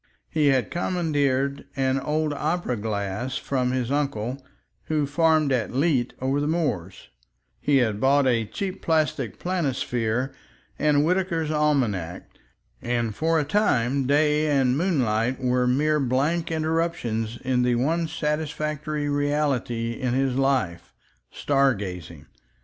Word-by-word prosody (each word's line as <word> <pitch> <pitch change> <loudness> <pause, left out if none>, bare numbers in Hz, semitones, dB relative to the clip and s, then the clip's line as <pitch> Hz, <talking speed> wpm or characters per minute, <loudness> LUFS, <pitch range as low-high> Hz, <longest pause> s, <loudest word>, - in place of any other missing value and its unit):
He 155 -2 +2
had 135 -3 +2
commandeered 145 -6 0
an 135 0 +1
old 150 +2 -1
opera 155 -2 -1
glass 105 +3 -3
from 130 -2 -1
his 130 -1 -1
uncle 135 -3 -2 0.4
who 155 -2 0
farmed 155 0 +2
at 125 -2 -1
Leet 135 -4 +1
over 135 +2 0
the 145 - 0
moors, 100 - -2 0.5
he 145 -1 +2
had 110 -5 +1
bought 140 +1 +4
a 115 -4 +1
cheap 195 - -5
paper 155 -5 +1
planisphere 130 -7 -1 0.5
and 150 -1 +3
Whitaker's 170 -3 0
Almanac, 125 - 0 0.5
and 120 -2 -1
for 160 +6 +1
a - - +1
time 140 - +1
day 150 +2 +3
and 135 -3 +2
moonlight 130 - +1
were 125 -1 +1
mere 150 +4 +2
blank 145 +6 0
interruptions 155 -9 -1
to 125 0 0
the 125 -1 +2
one 160 +7 0
satisfactory 150 -1 -2
reality 145 -5 0
in 125 +1 -2
his 135 -1 +1
life—star 130 - -1
gazing. 90 -6 -7
135 Hz, 125 wpm, -25 LUFS, 120-150 Hz, 0.5 s, bought